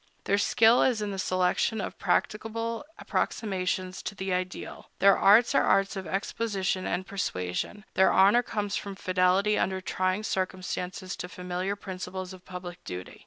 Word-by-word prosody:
Their 200 +1 +2
skill 225 +3 +5
is 245 -4 +3
in 205 - -3
the 195 - -5
selection 185 +4 +1
of - - -5
practicable 230 +3 -1
approximations 185 -2 -2
to 205 - -5
the 190 -1 -2
ideal; 180 0 -4
their 195 0 +6
arts 220 +4 +5
are - - +5
arts 195 +1 +2
of 190 -3 -5
exposition 195 0 -1
and 185 - -2
persuasion; 185 - -3
their 190 - +5
honor 200 +6 +6
comes 205 -4 -3
from 200 -1 -4
fidelity 185 +3 +2
under 190 0 0
trying 185 +2 -1
circumstances 185 -2 -3
to 180 - -6
familiar 180 +2 -3
principles 185 -1 -6
of 185 -1 -13
public 180 -1 -8
duty. 90 0 -7
190 Hz, 155 wpm, -28 LUFS, 185-205 Hz, -, their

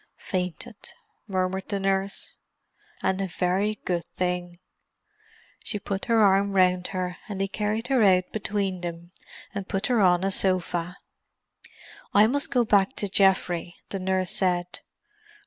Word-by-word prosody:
"Fainted," 185 +4 -5 0.3
murmured 190 -1 -2
the 200 -2 -1
nurse. 195 0 -1 0.7
"And 190 +1 +1
a 195 - -1
very 190 +4 0
good 175 -2 0
thing." 180 -1 -2 1.1
She 210 - -1
put 200 -1 -4
her 230 -2 +4
arm 200 0 +4
round 180 -1 +3
her, 180 -2 -3
and 200 -2 -4
they 195 - +1
carried 210 +3 -2
her 265 -3 +3
out 185 -3 +4
between 200 -3 -2
them, 170 0 -6 0.4
and 200 -1 -5
put 195 +1 -1
her 230 - +3
on 180 -1 +4
a 195 - +1
sofa. 180 -2 +1 1.2
"I 205 +1 +8
must 285 +6 0
go 245 -2 +2
back 200 -3 +3
to 205 - -1
Geoffrey," 185 -3 +2
the 195 - -3
nurse 185 -1 0
said. 180 -2 0
190 Hz, 145 wpm, -26 LUFS, 180-200 Hz, 1.2 s, I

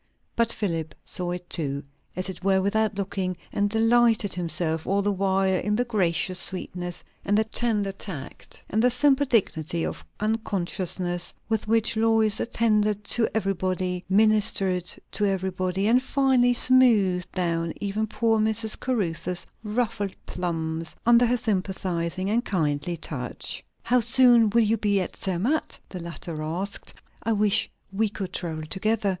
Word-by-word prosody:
But 230 -1 +3
Philip 165 -8 -3
saw 180 -1 -2
it 175 0 -5
too, 140 -5 -2 0.3
as 185 +1 -2
it 185 -1 -7
were 190 0 +3
without 205 +2 +1
looking; 190 -2 -2 0.2
and 205 0 +1
delighted 225 -1 +3
himself 165 -2 -2
all 200 +1 +1
the 205 - +1
while 190 0 +1
in 210 +3 0
the 245 +3 +1
gracious 185 -4 0
sweetness, 180 -2 -4 0.2
and 205 +1 +2
the 220 - +4
tender 220 -3 +1
tact, 185 -8 -6
and 220 - 0
the 250 - +5
simple 280 +2 +3
dignity 170 - 0
of - - -5 0.2
unconsciousness, 185 -5 -1
with 220 -1 -1
which 225 +1 +2
Lois 220 -1 +3
attended 215 -3 +1
to 235 -2 +2
everybody, 185 -3 -1
ministered 195 -3 +2 0.2
to 210 - +1
everybody, 190 0 -1
and 245 +3 +4
finally 260 -2 +3
smoothed 225 -9 +4
down 170 -2 -1
even 210 +2 -1
poor 225 0 +1
Mrs. 220 0 0
Caruthers' 180 -7 -1 0.2
ruffled 210 -2 -2
plumes 165 -2 -3
under 240 +1 +6
her 245 +2 +2
sympathizing 185 -4 -2
and 230 +4 +1
kindly 160 -2 -1
touch. 130 -6 -4 0.2
"How 250 +1 +3
soon 240 -2 +5
will 230 +2 +3
you 220 +1 +2
be 205 -1 +1
at 185 - -4
Zermatt?" 195 - -1
the 185 - -7
latter 170 -1 -6
asked. 180 +6 -3 0.3
"I 225 - 0
wish 210 +1 +2 0.2
we 215 +2 +1
could 195 -2 -6
travel 160 -3 -3
together! 205 +6 0
200 Hz, 145 wpm, -25 LUFS, 180-225 Hz, 0.3 s, under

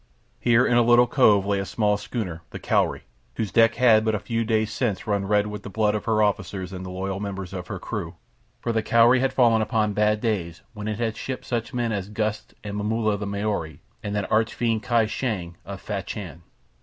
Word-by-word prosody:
Here, 120 +1 +4
in 120 - +3
a - - +6
little 120 +1 +6
cove, 105 -7 +4
lay 100 -1 +1
a - - -1
small 105 0 +1
schooner, 105 -5 -4
the - - -7
Cowrie, - - 0 0.3
whose 110 -4 -2
decks 115 +2 +4
had 115 -3 +5
but 110 -1 +1
a - - -1
few 115 +2 -2
days 110 -1 0
since 110 -6 -1
run 100 -2 -1
red 105 0 +3
with 105 0 -6
the - - -8
blood 105 +1 +1
of 105 - -3
her 110 -1 +2
officers 95 -2 -2
and 95 0 -6
the 95 - -6
loyal 95 +1 -3
members 95 -2 -5
of 90 -2 -6
her 95 - -5
crew, 90 -3 -5 0.4
for 120 - -2
the 115 -1 +1
Cowrie 115 +3 +5
had 135 +1 +1
fallen 115 -3 +4
upon 105 -1 0
bad 105 +1 +2
days 85 -7 -2
when 105 -1 -6
it 105 -1 -2
had 115 -1 -1
shipped 130 -1 -5
such 120 -2 -3
men 120 -3 -1
as 100 -2 -3
Gust 105 0 -3
and 105 -1 -5
Momulla 110 0 0
the 100 - -4
Maori 100 -6 -3 0.2
and 105 0 -4
that 105 -2 -2
arch 110 +1 +2
fiend 115 -2 0
Kai 115 -1 +2
Shang 105 -7 -3
of 100 -1 -7
Fachan. 95 -4 -6
105 Hz, 220 wpm, -24 LUFS, 100-115 Hz, 0.4 s, a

